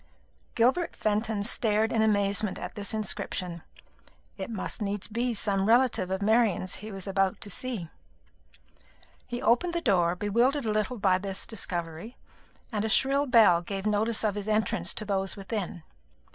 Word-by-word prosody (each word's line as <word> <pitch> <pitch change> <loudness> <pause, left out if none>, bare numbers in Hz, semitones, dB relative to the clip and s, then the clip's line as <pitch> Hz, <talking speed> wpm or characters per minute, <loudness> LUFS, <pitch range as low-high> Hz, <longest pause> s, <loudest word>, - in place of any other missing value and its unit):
Gilbert 260 +9 +2
Fenton 215 0 -1
stared 220 0 +2
in 225 - +2
amazement 205 -1 +1
at - - -6
this 205 -1 -3
inscription. 195 -5 -3 0.7
It 190 +1 -6
must 220 0 -4
needs 205 -1 -3
be 235 +2 -1
some 200 -1 +1
relative 235 -5 +3
of 190 +1 -2
Marian's 215 -4 +2
he 215 +2 -8
was 195 -2 -5
about 195 -1 0
to 205 - -3
see. 230 -6 -2 1.4
He 240 0 -5
opened 340 +9 +2
the 340 - 0
door, 180 - +2
bewildered 235 +8 +1
a 215 - 0
little 215 +4 -1
by 190 -3 +2
this 195 0 -4
discovery, 175 0 -5 0.5
and 210 -2 -1
a 220 - -1
shrill 275 +5 +3
bell 215 -8 +6
gave 195 +3 -5
notice 215 +2 +1
of 215 -2 +1
his 205 0 -5
entrance 220 +1 0
to 215 - -4
those 195 -1 -1
within. 195 -4 -5
210 Hz, 160 wpm, -28 LUFS, 195-230 Hz, 1.4 s, bell